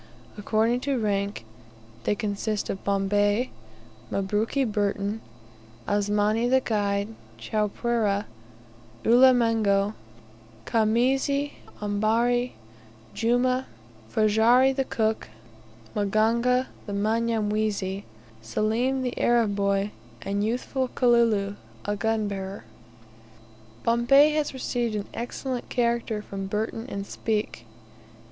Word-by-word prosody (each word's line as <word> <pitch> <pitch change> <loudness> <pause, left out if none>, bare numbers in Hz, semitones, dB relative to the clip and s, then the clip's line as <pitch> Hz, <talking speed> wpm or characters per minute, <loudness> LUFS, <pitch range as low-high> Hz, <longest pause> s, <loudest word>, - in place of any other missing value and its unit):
According 220 +3 +1
to 275 +1 -1
rank, 200 - -1 0.6
they - - +2
consist 210 -1 -2
of 195 - -6
Bombay, 205 +4 +1 0.6
Mabruki 210 +7 0
Burton, 205 0 -1 0.7
Asmani 210 +3 +1
the 260 +1 +5
guide, 205 -4 -1 0.3
Chowpereh, 210 - 0 0.8
Ulimengo, 230 -5 +4 0.7
Khamisi, 265 +6 +1 0.3
Ambari, 230 +4 +1 0.6
Jumah, 245 +4 +1 0.5
Ferajji 230 +5 +4
the 270 -1 0
cook, 220 -2 -1 0.7
Maganga 230 +5 +2 0.2
the 205 - -4
Mnyamwezi, 210 -2 0 0.4
Selim 225 - 0
the 250 - -2
Arab 230 -4 +3
boy, 200 0 +1 0.3
and 200 +1 -1
youthful 255 +4 -1
Kalulu 230 -5 +3 0.3
a 205 - -1
gunbearer. 205 -3 -2 1.2
Bombay 240 +6 +5
has 300 -1 0
received 240 -3 -2
an 205 -1 -2
excellent 245 +1 -4
character 235 -3 0
from 195 -1 -5
Burton 220 +3 -3
and 200 -3 -4
Speke. 210 - -3
220 Hz, 90 wpm, -26 LUFS, 205-240 Hz, 1.2 s, the